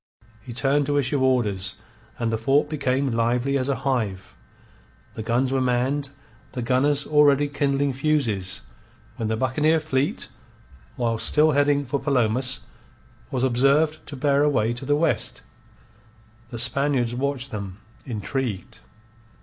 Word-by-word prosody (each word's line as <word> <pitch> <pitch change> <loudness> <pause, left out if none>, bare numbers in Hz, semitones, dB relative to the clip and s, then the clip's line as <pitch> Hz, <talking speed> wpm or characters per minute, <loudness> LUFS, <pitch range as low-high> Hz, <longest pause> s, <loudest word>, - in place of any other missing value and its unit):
He 120 - -10
turned 135 +4 +1
to 145 0 +1
issue 140 0 +1
orders, 110 -8 +1 0.4
and 115 -1 -1
the - - +1
fort 140 +6 +2
became 135 -2 0
lively 120 +4 +1
as 135 0 0
a 140 - +1
hive. 110 -8 -2 0.8
The - - -6
guns 120 +4 0
were 135 -1 +1
manned, 130 +3 0 0.4
the 125 -2 -3
gunners 140 +3 +2
already 145 -1 +4
kindling 140 -1 0
fuses, 125 -10 0 0.5
when 110 - -2
the 110 0 -1
buccaneer 150 +6 +2
fleet, 145 -3 -1 0.7
whilst 115 -2 +1
still 155 +1 +4
heading 145 0 +2
for 140 +2 -2
Palomas, 130 -1 +1 0.7
was 130 -1 -2
observed 140 +5 +2
to 145 - -7
bear 140 +1 +2
away 120 -6 +2
to 120 +3 -5
the 145 +2 +2
west. 160 +1 0 1.1
The 120 - -6
Spaniards 125 0 +1
watched 135 +1 -2
them, 100 -3 -6 0.3
intrigued. 115 -2 -4
130 Hz, 135 wpm, -24 LUFS, 120-145 Hz, 1.1 s, already